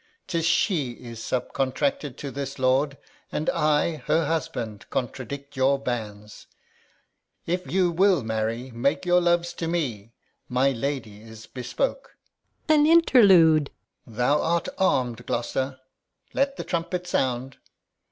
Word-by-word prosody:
'Tis 165 -2 -1
she 155 - +1
is 115 -1 -10
subcontracted 135 - -2
to 140 -3 -6
this 140 0 -5
lord, 135 +2 +1 0.3
And 155 - 0
I, 155 0 +1
her 165 0 +2
husband, 125 -9 -3
contradict 140 +3 -5
your 135 +1 +3
banes. 105 -6 -6 1.0
If 180 +2 -3
you 180 -1 +2
will 185 -3 +3
marry, 110 +3 -2
make 125 +9 0
your 180 0 +4
loves 175 0 +1
to 165 - -4
me; 120 -11 -3 0.4
My 130 +2 +2
lady 115 -5 -4
is 110 0 -12
bespoke. - - -3 0.5
Gon. 310 -1 +4
An 295 - +5
interlude! 190 - +6 0.4
Alb. 115 - -14
Thou 125 +5 +2
art 170 0 0
arm'd, 125 -9 +1
Gloucester. 130 +2 -2 0.5
Let 275 0 0
the - - -4
trumpet 175 +1 -3
sound. 130 -5 -1
140 Hz, 130 wpm, -25 LUFS, 125-170 Hz, 1.0 s, interlude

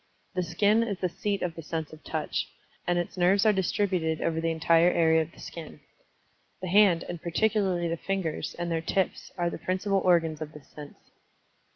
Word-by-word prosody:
The 185 - 0
skin 200 +6 +2
is 215 -4 -1
the 185 - 0
seat 200 +3 -2
of 175 -2 -2
the 165 - -8
sense 160 0 -4
of 155 - -13
Touch, 155 -1 -2 0.4
and 175 0 +2
its 175 +1 -3
nerves 190 +4 +4
are 215 - +6
distributed 180 -4 0
over 165 -1 -1
the 165 - 0
entire 165 +1 +4
area 160 -2 +4
of 160 +1 -5
the - - -18
skin. 165 -2 -9 0.8
The 185 - -5
hand, 190 -3 +5
and 175 -2 -6
particularly 185 -1 +1
the 165 0 -2
fingers, 190 -3 -3
and 175 0 -3
their 165 -1 0
tips, 190 +3 -1
are 175 -1 0
the - - -6
principal 185 +3 0
organs 165 -4 +2
of 155 0 -6
this 150 -3 -14
sense. 150 -1 -11
175 Hz, 195 wpm, -28 LUFS, 160-190 Hz, 0.8 s, are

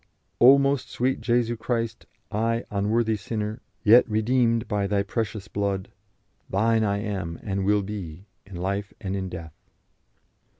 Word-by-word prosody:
"O 130 +3 +9
most 140 -1 +1
sweet 130 0 -1
Jesu 120 0 +1
Christ, 115 -1 -3 0.2
I, 115 +2 0
unworthy 110 +3 +1
sinner, 105 +2 -4 0.2
yet 115 +3 +6
redeemed 115 +1 +2
by 105 -3 0
Thy 100 0 +1
precious 105 -1 -3
blood.... 100 -2 -2 0.6
Thine 110 +3 +2
I 100 -1 +1
am 95 -6 -3
and 95 -2 -2
will 105 0 +3
be, 95 -3 -7 0.2
in 95 0 -12
life 100 +3 -3
and 95 -1 -3
in 95 -1 -3
death." 80 -3 -8
105 Hz, 140 wpm, -25 LUFS, 100-115 Hz, 0.6 s, O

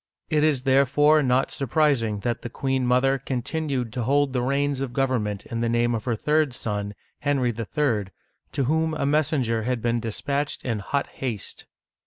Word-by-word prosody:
It 150 -1 +3
is 145 -5 +2
therefore 140 +3 +4
not 130 -1 +2
surprising 130 -6 +1
that 120 0 -2
the 120 - -5
queen 130 +1 -1
mother 135 +2 +3
continued 130 -1 -2
to 125 - -2
hold 140 +3 +2
the 125 - +1
reins 140 +1 0
of 130 -3 -3
government 120 -7 -1
in 115 - -4
the 115 0 0
name 120 +1 +2
of 110 -2 -3
her 120 -3 0
third 150 +2 +1
son, 105 -3 -3 0.2
Henry 135 -4 +1
III., 115 -2 0 0.5
to 140 - 0
whom 160 +4 +1
a 150 - -1
messenger 140 -6 +1
had 125 +2 -1
been 120 +1 0
dispatched 140 +6 -3
in 115 -4 -1
hot 140 +8 -1
haste. 115 -7 -6
130 Hz, 175 wpm, -25 LUFS, 115-145 Hz, 0.5 s, therefore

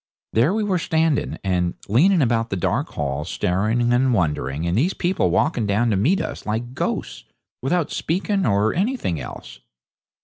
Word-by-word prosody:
There 120 +9 +3
we 220 - 0
were 190 -3 0
standing 160 -2 0
and 90 -2 0
leaning 160 - +4
about 115 -1 +1
the - - -2
dark 90 - -1
hall, 70 0 -3
staring 110 +8 0
and 125 +1 +3
wondering, 75 - -1
and 85 +1 0
these 160 - +1
people 180 +1 +1
walking 120 -9 +1
down 110 +4 +2
to - - +2
meet 145 - +2
us - - -5
like 115 +3 -3
ghosts, - - -3 0.4
without 165 +4 0
speaking 195 +4 -1
or 105 - +2
anything 200 - -1
else. - - -9
120 Hz, 165 wpm, -22 LUFS, -, 0.4 s, leaning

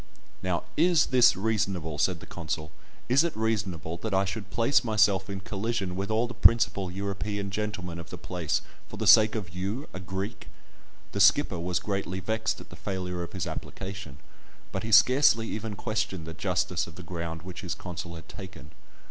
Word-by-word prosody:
"Now, 90 -2 -1
is 170 0 +4
this 125 -5 +6
reasonable?" 95 -7 -1
said - - +1
the - - -9
consul; 80 -1 -4 0.4
"is 130 +5 +5
it 170 -9 -2
reasonable 95 -8 -1
that 105 +1 -2
I 95 +1 +3
should 100 +1 -5
place 120 +6 +3
myself 105 -4 +3
in 95 -1 -4
collision 100 -2 -2
with 100 +2 -3
all 110 +2 +2
the 120 - -7
principal 100 -5 +4
European 100 +1 -3
gentlemen 95 -4 -3
of 85 - -9
the 90 - -7
place 85 -2 -2 0.3
for - - -8
the - - -2
sake 110 0 +7
of 95 -6 -4
you, 100 - -3
a 95 - -5
Greek?" 95 +4 -5 0.6
The - - -3
skipper 85 - +5
was 90 0 -1
greatly 95 -1 -2
vexed 110 +3 -1
at - - -13
the - - -8
failure 90 -3 -4
of 85 - -6
his 95 -2 -2
application, 90 -2 -6 0.5
but - - -2
he 110 - -4
scarcely 125 0 +6
even 110 -1 -4
questioned 105 -5 -2
the 80 - -6
justice 80 - 0
of 80 - -12
the 90 - -9
ground 85 -1 -5
which 90 -1 -7
his - - -3
consul 85 -1 -6
had 80 - -11
taken. 95 -8 -10
95 Hz, 185 wpm, -28 LUFS, 90-110 Hz, 0.6 s, sake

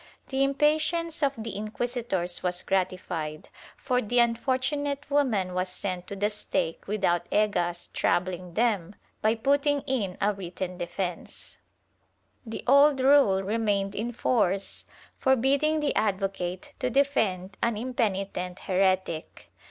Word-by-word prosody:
The 270 0 +1
impatience 310 +4 +1
of 280 -2 +2
the 225 -2 -5
inquisitors 215 -4 -2
was 180 -1 -1
gratified, 180 -5 -2 0.3
for 250 -2 0
the 245 +2 -2
unfortunate 265 +5 +1
woman 220 -11 +1
was 185 0 -1
sent 185 -1 -4
to 200 - -5
the 205 +2 0
stake 165 -5 -3
without 180 -4 0
Egas 175 -5 +1
troubling 180 -1 -1
them 210 -5 +1 0.3
by 220 +1 +3
putting 280 +4 +2
in 210 -10 -2
a 210 +1 +2
written 180 -1 -6
defence/ 175 0 -5 0.9
The 225 - -5
old 280 +2 +6
rule 260 -8 +5
remained 205 -1 0
in 230 +3 -3
force 200 -5 0 0.3
forbidding 275 +4 +2
the 290 - +1
advocate 195 +3 -1
to 255 -3 0
defend 220 -9 +1
an 235 -2 +1
impenitent 195 -6 -2
heretic. 185 -3 0
210 Hz, 120 wpm, -27 LUFS, 185-265 Hz, 0.9 s, old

